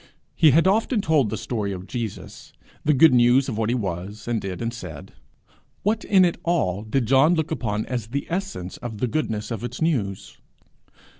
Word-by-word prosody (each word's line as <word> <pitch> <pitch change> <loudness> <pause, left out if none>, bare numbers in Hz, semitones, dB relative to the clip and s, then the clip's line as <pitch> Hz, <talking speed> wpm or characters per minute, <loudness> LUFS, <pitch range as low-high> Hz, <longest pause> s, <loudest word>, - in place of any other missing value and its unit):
He 160 - +6
had 160 +5 +4
often 220 +4 +2
told 155 - +2
the 110 - -3
story 105 -4 -3
of 95 -1 -6
Jesus, 115 -2 -7 0.3
the 150 0 +3
good 150 +1 +6
news 125 +2 +4
of 125 - -3
what 110 0 -1
he 120 - +1
was, 100 -1 -5
and 120 -2 -1
did, 95 -2 -5
and 115 0 -3
said: 90 -11 -9 0.7
what 215 +3 0
in 190 -3 +5
it 170 - -1
all 125 - 0
did 115 +4 -1
John 135 +8 +4
look 160 -2 -2
upon 110 -8 -2
as 120 -4 -4
the 140 +5 -3
essence 180 - -4
of 115 -3 -7
the 115 - 0
goodness 115 -5 -2
of 115 0 -4
its 120 - -5
news? 120 - -2
120 Hz, 195 wpm, -23 LUFS, 105-160 Hz, 0.7 s, He